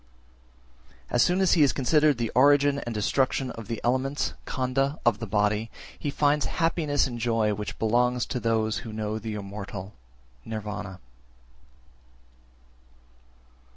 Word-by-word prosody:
374. -, -, -3 dB
As 120 Hz, -, +5 dB
soon 180 Hz, +2 st, +3 dB
as 190 Hz, -, +4 dB
he 165 Hz, -, +4 dB
has 140 Hz, -3 st, +5 dB
considered 150 Hz, +1 st, +3 dB
the 115 Hz, -2 st, -2 dB
origin 145 Hz, +2 st, +4 dB
and 120 Hz, -4 st, -5 dB
destruction 130 Hz, +4 st, 0 dB
of 115 Hz, -2 st, -9 dB
the 115 Hz, -1 st, -3 dB
elements 130 Hz, +4 st, 0 dB
(khandha) 135 Hz, +3 st, 0 dB
of 115 Hz, -3 st, +3 dB
the 115 Hz, -, -5 dB
body, 105 Hz, +2 st, +1 dB, 0.3 s
he 145 Hz, -, -2 dB
finds 145 Hz, +1 st, +2 dB
happiness 165 Hz, -4 st, +1 dB
and 120 Hz, -3 st, -5 dB
joy 115 Hz, -2 st, +1 dB
which 105 Hz, +1 st, -5 dB
belong 120 Hz, +3 st, +2 dB
to 125 Hz, -, -2 dB
those 110 Hz, -2 st, 0 dB
who 115 Hz, -, -8 dB
know 110 Hz, 0 st, -3 dB
the 110 Hz, 0 st, -5 dB
immortal 100 Hz, -1 st, -7 dB, 0.5 s
(Nirvana). 105 Hz, -3 st, -6 dB
120 Hz, 140 wpm, -26 LUFS, 110-140 Hz, 0.5 s, As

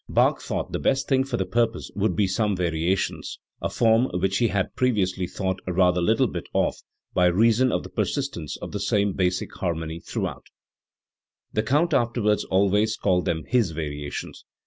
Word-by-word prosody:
Bach -, -, +3 dB
thought -, -, -3 dB
the -, -, -2 dB
best 135 Hz, +1 st, +1 dB
thing 135 Hz, -1 st, +3 dB
for 135 Hz, -, -3 dB
the 95 Hz, -, -1 dB
pur 115 Hz, +5 st, +2 dB
pose 115 Hz, -, -9 dB
would 105 Hz, +2 st, 0 dB
be 105 Hz, -, +3 dB
some 100 Hz, +2 st, 0 dB
variations, 85 Hz, +1 st, -1 dB, 0.2 s
a -, -, -1 dB
form 115 Hz, +2 st, +3 dB
which 95 Hz, +4 st, 0 dB
h 115 Hz, -, +3 dB
had 100 Hz, -2 st, -1 dB
previously 95 Hz, -7 st, +1 dB
thought 95 Hz, 0 st, -2 dB
rather 90 Hz, 0 st, +3 dB
little 110 Hz, +8 st, +3 dB, 0.3 s
of, -, -, +2 dB, 0.4 s
by 90 Hz, -, +4 dB
reason 115 Hz, +7 st, +3 dB
of -, -, -1 dB
the -, -, -9 dB
persistence 130 Hz, -, -2 dB
of -, -, -6 dB
the -, -, -3 dB
same 100 Hz, -1 st, +1 dB
basic 90 Hz, -1 st, -1 dB
harmony 80 Hz, -2 st, -3 dB
throughout -, -, -5 dB, 1.1 s
The 110 Hz, -, +2 dB
Count 150 Hz, +9 st, +1 dB
afterwards 115 Hz, -5 st, +1 dB
al 95 Hz, +1 st, +4 dB
ways 110 Hz, +2 st, +2 dB
called 90 Hz, -2 st, +1 dB
them 80 Hz, -1 st, -1 dB
Ms 115 Hz, -10 st, +3 dB
variations. 75 Hz, -2 st, -5 dB
100 Hz, 175 wpm, -25 LUFS, 90-115 Hz, 1.1 s, by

